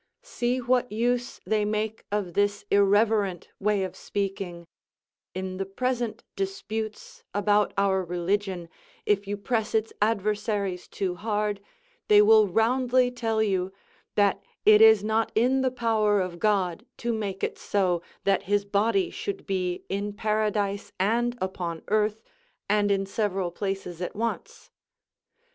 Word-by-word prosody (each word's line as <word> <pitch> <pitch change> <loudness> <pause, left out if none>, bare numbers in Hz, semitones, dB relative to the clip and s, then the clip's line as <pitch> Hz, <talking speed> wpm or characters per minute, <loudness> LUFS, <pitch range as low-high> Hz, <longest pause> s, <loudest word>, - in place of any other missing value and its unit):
See 245 +1 -1
what 250 -1 +1
use 245 +3 -1
they 215 -1 +1
make 215 +1 -2
of 200 -4 -2
this 205 +1 +1
irreverent 200 -2 +3
way 205 -1 +1
of 185 - -5
speaking; 195 -4 -4 0.7
in 185 0 -4
the 195 - -2
present 245 +2 -2
disputes 220 - -4
about 205 0 +3
our 195 -1 +2
religion, 180 +1 -2 0.4
if 200 -1 +1
you 205 0 -2
press 220 +1 -1
its 220 0 0
adversaries 210 -3 0
too 190 -2 -2
hard, 210 +1 -2 0.5
they 210 - +7
will 215 0 +7
roundly 245 +5 +2
tell 225 -3 0
you, 190 -3 0 0.4
"that 200 -1 +3 0.2
it 215 0 +7
is 220 -2 +7
not 220 +1 +1
in 255 +4 +3
the 260 - +2
power 220 -4 +2
of 180 -2 -3
God 195 -2 +1
to 235 0 -1
make 200 -3 -4
it - - -2
so, 185 -4 +1 0.2
that 195 -1 +2
his 205 0 +2
body 225 - +1
should 400 -1 -5
be 180 -2 -2
in 200 +1 -3
paradise 210 -2 -1
and 240 +5 +1
upon 175 -3 -4
earth, 215 +1 +1 0.4
and 205 0 +2
in 195 -1 +1
several 195 -3 -1
places 190 -2 -4
at 180 - -4
once." 230 +2 -4
205 Hz, 140 wpm, -26 LUFS, 195-220 Hz, 0.7 s, they